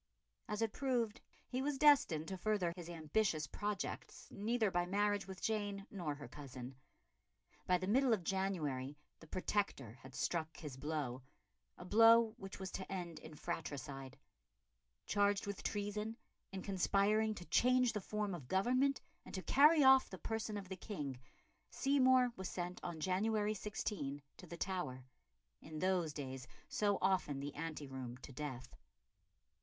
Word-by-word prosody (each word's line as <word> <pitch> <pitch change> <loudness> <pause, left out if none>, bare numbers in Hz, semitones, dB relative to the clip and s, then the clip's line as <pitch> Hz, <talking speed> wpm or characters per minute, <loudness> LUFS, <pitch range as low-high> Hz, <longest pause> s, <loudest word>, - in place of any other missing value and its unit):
As 210 +1 -1
it 220 - -1
proved 245 -5 0 0.3
he 255 +1 -2
was 285 0 0
destined 265 - +5
to 190 - -3
further 190 -4 +1
his 175 -2 -8
ambitious 160 0 0
projects 205 +4 -4
neither 220 0 +1
by 175 -1 +1
marriage 205 +1 +1
with 190 -1 -8
Jane 205 -2 -1
nor 170 -7 -3
her 145 0 -9
cousin. 130 -3 -8 0.9
By 180 - +5
the 185 - -3
middle 250 +6 +4
of 210 -6 +2
January 155 -8 -1 0.2
the 160 - -14
Protector 155 - -1
had 130 0 -12
struck 160 -2 -1
his 150 -6 -7
blow 140 -3 -3 0.6
a 180 - -9
blow 225 +2 +7
which 195 -3 -7
was 190 -1 -5
to 190 - -5
end 175 -4 -4
in 155 - -11
fratricide. 140 -5 -5 0.9
Charged 205 -1 +2
with 200 -1 -4
treason, 210 +2 -2 0.3
in 190 -1 -5
conspiring 205 +3 +2
to 175 - -8
change 250 +2 +4
the 210 - -2
form 210 0 -2
of 150 -8 -7
government 255 - +2 0.2
and - - -8
to 185 - -4
carry 300 +2 +6
off 265 0 +7
the 190 - -7
person 220 +1 -3
of 195 -2 -6
the 190 - -5
King, 145 - -5 0.5
Seymour 260 -2 +4
was 190 -1 -4
sent 180 0 -4
on 170 -2 -4
January 210 +4 +1
16 185 -9 -3
to 180 - -11
the 170 - -7
Tower 165 -10 -3 0.6
in 155 0 -8
those 180 -2 +1
days 130 -3 -6 0.2
so 205 -2 +2
often 185 -7 +2
the 140 +1 -4
ante 155 -1 -4
room 130 -2 -6
to - - -8
death. 130 -3 -6
190 Hz, 155 wpm, -37 LUFS, 155-215 Hz, 0.9 s, blow